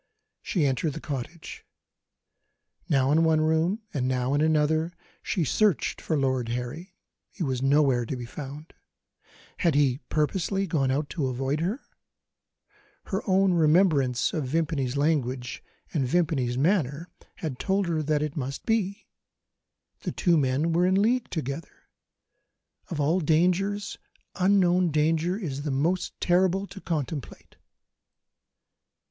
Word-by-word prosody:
She 170 Hz, -6 st, 0 dB
entered 135 Hz, +3 st, 0 dB
the 160 Hz, -, -6 dB
cottage. 150 Hz, +3 st, -6 dB, 1.3 s
Now 135 Hz, -1 st, +3 dB
in 160 Hz, +2 st, +4 dB
one 160 Hz, -1 st, +3 dB
room, 160 Hz, +7 st, +1 dB
and 130 Hz, -3 st, -1 dB
now 130 Hz, +1 st, 0 dB
in 145 Hz, -, +2 dB
another, 155 Hz, +2 st, +2 dB, 0.3 s
she 175 Hz, -, -1 dB
searched 200 Hz, +4 st, +1 dB
for 160 Hz, -, -1 dB
Lord 130 Hz, -3 st, 0 dB
Harry; 125 Hz, +10 st, -5 dB, 0.3 s
he 185 Hz, -, -5 dB
was 130 Hz, -4 st, -1 dB
nowhere 135 Hz, -3 st, +3 dB
to 135 Hz, -, -3 dB
be 125 Hz, -1 st, -6 dB
found. 145 Hz, +5 st, -9 dB, 0.8 s
Had 170 Hz, -5 st, +2 dB
he 140 Hz, -3 st, +3 dB
purposely 190 Hz, +5 st, 0 dB
gone 150 Hz, -7 st, 0 dB
out 145 Hz, +3 st, 0 dB
to 150 Hz, -7 st, -1 dB
avoid 135 Hz, +3 st, -1 dB
her? 195 Hz, -, -2 dB, 1.2 s
Her 195 Hz, -1 st, -3 dB
own 190 Hz, -1 st, +4 dB
remembrance 155 Hz, -6 st, +3 dB
of 155 Hz, -4 st, -1 dB
Vimpany's 140 Hz, -3 st, -1 dB
language 130 Hz, -5 st, -1 dB, 0.3 s
and 135 Hz, -5 st, 0 dB
Vimpany's 135 Hz, -6 st, +1 dB
manner 155 Hz, 0 st, +1 dB, 0.5 s
told 195 Hz, 0 st, +1 dB
her 165 Hz, -2 st, 0 dB
that 150 Hz, 0 st, 0 dB
so -, -, +1 dB
it 150 Hz, -, -6 dB
must 135 Hz, -1 st, -4 dB
be 215 Hz, -2 st, -1 dB, 0.9 s
the -, -, -4 dB
two 175 Hz, -3 st, +2 dB
men 145 Hz, +3 st, +1 dB
were 175 Hz, +2 st, +3 dB
in 190 Hz, +1 st, +3 dB
league 240 Hz, +4 st, +1 dB
together. 150 Hz, -1 st, -6 dB, 1.0 s
Of 160 Hz, -, -4 dB
all 155 Hz, +6 st, +2 dB
dangers, 180 Hz, +6 st, +1 dB, 0.3 s
unknown 185 Hz, -2 st, +3 dB
danger 160 Hz, +4 st, +1 dB
is 145 Hz, -10 st, -4 dB
the 145 Hz, -, -3 dB
most 160 Hz, +7 st, -1 dB
terrible 185 Hz, +2 st, +2 dB
to 195 Hz, -, -11 dB
contemplate. 155 Hz, -5 st, -5 dB
155 Hz, 135 wpm, -26 LUFS, 135-180 Hz, 1.3 s, in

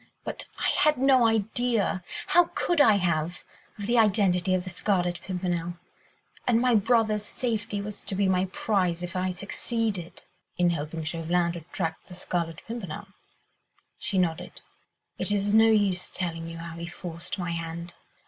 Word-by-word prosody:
But -, -, -5 dB
I -, -, +1 dB
had 305 Hz, -2 st, +3 dB
no 260 Hz, -2 st, +5 dB
idea—how 225 Hz, -, +1 dB
could 345 Hz, -4 st, +2 dB
I 225 Hz, -7 st, +7 dB
have?—of 175 Hz, +2 st, -3 dB
the 235 Hz, +2 st, +3 dB
identity 190 Hz, -4 st, +3 dB
of 180 Hz, -, -1 dB
the 185 Hz, -, -6 dB
Scarlet 175 Hz, -2 st, 0 dB
Pimpernel... 175 Hz, -2 st, -2 dB, 0.7 s
and 235 Hz, -2 st, +4 dB
my 250 Hz, 0 st, +3 dB
brother's 215 Hz, -1 st, +3 dB
safety 215 Hz, -3 st, -2 dB
was 210 Hz, 0 st, -7 dB
to 195 Hz, -, -2 dB
be 195 Hz, 0 st, +2 dB
my 185 Hz, 0 st, +2 dB
prize 185 Hz, -3 st, 0 dB
if 175 Hz, 0 st, -5 dB
I 185 Hz, 0 st, 0 dB
succeeded." 200 Hz, 0 st, -3 dB, 0.3 s
"In 175 Hz, -1 st, +3 dB
helping 160 Hz, 0 st, -3 dB
Chauvelin 170 Hz, +2 st, 0 dB
to 170 Hz, -, -5 dB
track 165 Hz, -3 st, -2 dB
the 180 Hz, -, -10 dB
Scarlet 170 Hz, -2 st, -3 dB
Pimpernel?" 200 Hz, -5 st, -6 dB, 0.9 s
She 220 Hz, -4 st, -2 dB
nodded. 175 Hz, -2 st, -1 dB, 0.6 s
"It -, -, 0 dB
is 205 Hz, 0 st, +1 dB
no 220 Hz, +1 st, +7 dB
use 200 Hz, -5 st, +2 dB
telling 165 Hz, -2 st, -3 dB
you 165 Hz, 0 st, -7 dB
how 165 Hz, 0 st, -7 dB
he 170 Hz, 0 st, -5 dB
forced 170 Hz, 0 st, -6 dB
my 175 Hz, -2 st, -2 dB
hand. 170 Hz, +1 st, -5 dB
185 Hz, 155 wpm, -27 LUFS, 170-215 Hz, 0.9 s, I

